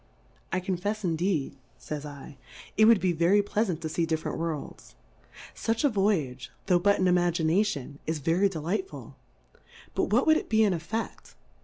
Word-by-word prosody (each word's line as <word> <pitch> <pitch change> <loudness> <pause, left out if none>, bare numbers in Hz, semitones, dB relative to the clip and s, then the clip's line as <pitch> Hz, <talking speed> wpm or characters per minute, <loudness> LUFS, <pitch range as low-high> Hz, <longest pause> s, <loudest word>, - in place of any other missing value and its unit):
I 185 - +1
confefs 195 +4 -3
indeed, 165 -5 -1 0.2
fa)'s 150 -1 -5
7, 145 0 -10 0.4
it 215 - +5
would 225 -2 +6
be 185 - +1
very 175 +5 +3
plea 210 +2 0
lant 175 -5 -3
to 160 - -3
fee 165 +1 -1
different 160 -1 -2
Worlds; 165 -3 -5 0.6
fuch 225 +3 -1
a 290 - +5
Voyage, 165 - 0 0.2
tho' 180 -2 +3
but 200 +3 +3
in 185 - +2
Imagination, 175 -4 +1
is 160 0 0
ve 155 +3 0
ry 195 +4 +3
delightful; 190 - -4 0.8
but - - +1
what - - +3
would 315 -1 +5
it - - -5
be 220 0 +4
in 205 -3 +3
EtfeQ:? 190 +7 -5
180 Hz, 170 wpm, -27 LUFS, 160-205 Hz, 0.8 s, would